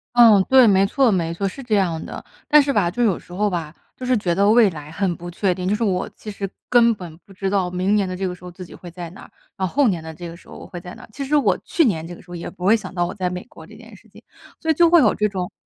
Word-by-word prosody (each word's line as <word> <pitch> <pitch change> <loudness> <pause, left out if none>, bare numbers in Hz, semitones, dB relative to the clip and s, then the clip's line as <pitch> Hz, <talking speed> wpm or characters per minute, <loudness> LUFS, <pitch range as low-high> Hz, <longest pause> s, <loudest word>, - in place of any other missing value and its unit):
嗯， 225 -5 +7
对， 260 -1 +7
没 195 -1 +4
错， 265 +1 +2
没 170 -4 -1
错， 195 +4 -2
是 235 +8 -7
这 235 -5 0
样 175 -5 0
的。 - - -8 0.2
但 300 0 +7
是 280 0 -1
吧， 200 -7 +2
就 240 +7 -1
有 205 -7 +1
时 - - -19
候 205 +4 0
吧， 165 -4 -4 0.2
就 255 - -7
是 250 -1 +2
觉 180 -5 0
得 200 +3 +3
未 225 -1 +6
来 150 -2 -9
很 180 +1 -1
不 175 +1 -8
确 185 +2 0
定， 180 +1 -5
就 205 - +2
是 230 - -2
我 185 -4 -1
其 215 - -8
实 200 -1 -5 0.2
根 235 -1 +5
本 175 -5 -10
不 - - -19
知 195 0 -3
道 190 -2 0
明 185 +3 0
年 200 -3 +1
的 185 - -4
这 190 0 -2
个 180 - -4
时 180 - -20
候 180 - -8
自 180 +1 -10
己 - - -14
会 175 - -11
在 175 0 -8
哪 190 - -13
儿， - - -15 0.2
然 190 - -1
后 - - -11
后 285 -3 +4
年 175 -5 -1
的 160 0 -8
这 175 +2 -8
个 165 - -9
时 170 - -19
候 - - -10
我 - - -10
会 175 - -9
在 180 0 -10
哪 - - -13
儿， - - -15
其 280 - -5
实 280 +2 0
我 210 -11 +3
去 330 - +2
年 165 -9 0
这 175 - -8
个 - - -15
时 175 - -17
候 - - -6
也 170 - -6
不 180 -2 -8
会 210 +4 +6
想 195 -4 -6
到 175 -1 0
我 - - -5
在 185 -2 -2
美 180 0 -6
国 - - -14
这 - - -14
件 - - -14
事 - - -20
情， - - -17 0.4
所 320 - -5
以 - - +3
就 340 +2 +4
会 345 0 +6
有 230 -9 +4
这 210 0 0
种 185 -3 -4
190 Hz, 360 characters per minute, -21 LUFS, 175-220 Hz, 0.4 s, 嗯